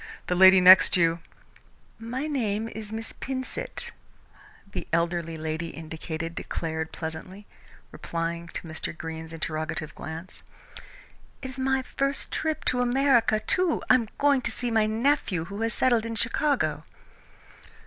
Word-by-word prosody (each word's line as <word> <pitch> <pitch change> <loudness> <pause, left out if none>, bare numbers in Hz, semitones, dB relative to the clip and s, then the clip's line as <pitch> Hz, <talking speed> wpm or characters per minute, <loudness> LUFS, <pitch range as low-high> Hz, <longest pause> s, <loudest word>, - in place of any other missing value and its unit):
The - - 0
lady 190 +1 +8
next 185 +1 +8
you 165 -1 +3 0.4
" - - -34 0.2
"My 265 +3 -1
name 225 -7 -1
is 215 -2 -8
Miss 225 0 -5
Pinsent," 265 - -5 0.8
the - - -5
elderly 170 0 0
lady 160 +1 -3
indicated 160 0 -6
declared 160 -1 -4
pleasantly, 180 +5 -7 0.5
replying 170 0 -4
to - - -7
Mr. 160 0 -5
Greene's 160 0 -6
interrogative 155 -1 -4
glance. 160 +3 -8 1.0
"It 260 - -4
is 265 - -7
my 265 0 +1
first 275 +1 -2
trip 315 -1 -2
to 250 -1 +2
America, 245 -3 +3
too. 360 +6 +1
I - - +9
am 235 -4 +2
going 285 -1 +4
out 255 - -9
to - - +2
see 245 +2 -2
a 220 -2 +3
nephew 220 - +1
who 200 +4 -7
has 230 0 +1
settled 235 -3 +3
in 230 - -4
Chicago." 230 - 0
200 Hz, 145 wpm, -26 LUFS, 165-255 Hz, 1.0 s, I